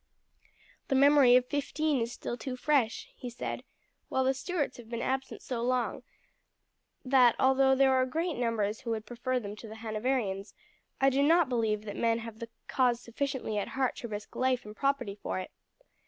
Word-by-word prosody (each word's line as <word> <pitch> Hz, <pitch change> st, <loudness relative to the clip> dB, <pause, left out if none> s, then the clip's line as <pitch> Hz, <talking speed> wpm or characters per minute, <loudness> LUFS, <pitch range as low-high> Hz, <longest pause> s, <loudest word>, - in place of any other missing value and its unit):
"The 270 Hz, -, +1 dB
memory 275 Hz, -2 st, +7 dB
of 250 Hz, 0 st, +4 dB
'15 290 Hz, 0 st, 0 dB
is 230 Hz, +1 st, -2 dB
still 240 Hz, -, -5 dB
too 255 Hz, +1 st, -5 dB
fresh," 265 Hz, -5 st, +1 dB
he 250 Hz, -, -7 dB
said; 240 Hz, -, -5 dB, 0.5 s
"while 265 Hz, -, +1 dB
the 265 Hz, +1 st, +3 dB
Stuarts 300 Hz, +3 st, -2 dB
have 235 Hz, -2 st, -12 dB
been 235 Hz, -1 st, -3 dB
absent 265 Hz, 0 st, -3 dB
so 245 Hz, -3 st, -3 dB
long 250 Hz, 0 st, 0 dB, 1.0 s
that, 255 Hz, -3 st, +5 dB
although 265 Hz, 0 st, +4 dB
there 265 Hz, 0 st, +4 dB
are 260 Hz, 0 st, +3 dB
great 330 Hz, +6 st, -1 dB
numbers 225 Hz, -4 st, -1 dB
who 235 Hz, -, -6 dB
would 220 Hz, -1 st, -2 dB
prefer 250 Hz, +3 st, -2 dB
them 205 Hz, -3 st, -7 dB
to 225 Hz, -, -9 dB
the 220 Hz, -, -9 dB
Hanoverians, 215 Hz, -3 st, -2 dB, 0.4 s
I 270 Hz, 0 st, +4 dB
do 270 Hz, +2 st, +2 dB
not 325 Hz, 0 st, +4 dB
believe 220 Hz, -4 st, 0 dB
that 205 Hz, -1 st, -6 dB
men 230 Hz, 0 st, +2 dB
have 225 Hz, -1 st, -8 dB
the 230 Hz, -, -6 dB, 0.2 s
cause 250 Hz, -3 st, +2 dB
sufficiently 245 Hz, -2 st, -3 dB
at 200 Hz, -, -3 dB
heart 260 Hz, -2 st, +1 dB
to 235 Hz, -, -5 dB
risk 210 Hz, -1 st, -7 dB
life 255 Hz, -2 st, +1 dB
and 210 Hz, 0 st, -9 dB
property 275 Hz, -6 st, 0 dB
for -, -, -3 dB
it. 185 Hz, -, -5 dB
250 Hz, 185 wpm, -30 LUFS, 225-270 Hz, 1.0 s, memory